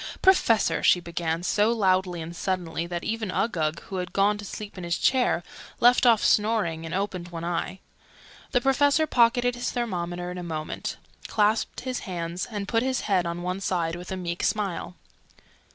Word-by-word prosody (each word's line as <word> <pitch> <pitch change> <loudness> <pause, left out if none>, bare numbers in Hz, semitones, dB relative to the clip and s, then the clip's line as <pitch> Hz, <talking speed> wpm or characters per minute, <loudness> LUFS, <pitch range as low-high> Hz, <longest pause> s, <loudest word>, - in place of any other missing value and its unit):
"Professor!" 370 - +4
she 180 - +5
began, 170 -1 -3
so 210 +4 +2
loudly 185 -5 +1
and 170 +2 -8
suddenly 170 -2 -2
that 175 0 -4
even 220 -2 -2
Uggug, 170 -6 -1
who 195 - -6
had 180 -1 -4
gone 200 +1 +3
to - - -7
sleep 205 +1 -7
in 185 - -7
his 170 0 -1
chair, 250 -9 +2 0.4
left 245 +1 +5
off 230 -3 +5
snoring 205 -7 +2
and 165 - -4
opened 190 -3 -2
one 170 -1 -7
eye. 175 +2 -2 0.7
The 245 - +2
Professor 285 +4 +3
pocketed 245 -2 +3
his 245 0 -3
thermometer 180 -7 -3
in 180 - -6
a - - -5
moment, 155 -2 -4 0.3
clasped 215 +1 +1
his 255 -1 -3
hands, 175 -2 -4
and 205 -3 -4
put 225 -1 +1
his 260 0 0
head 185 -4 +1
on 170 +1 -4
one 180 +1 -2
side 170 -3 -1
with 180 +1 -8
a 190 - -2
meek 175 -1 -4
smile. 195 -4 -1
185 Hz, 180 wpm, -26 LUFS, 175-225 Hz, 0.7 s, she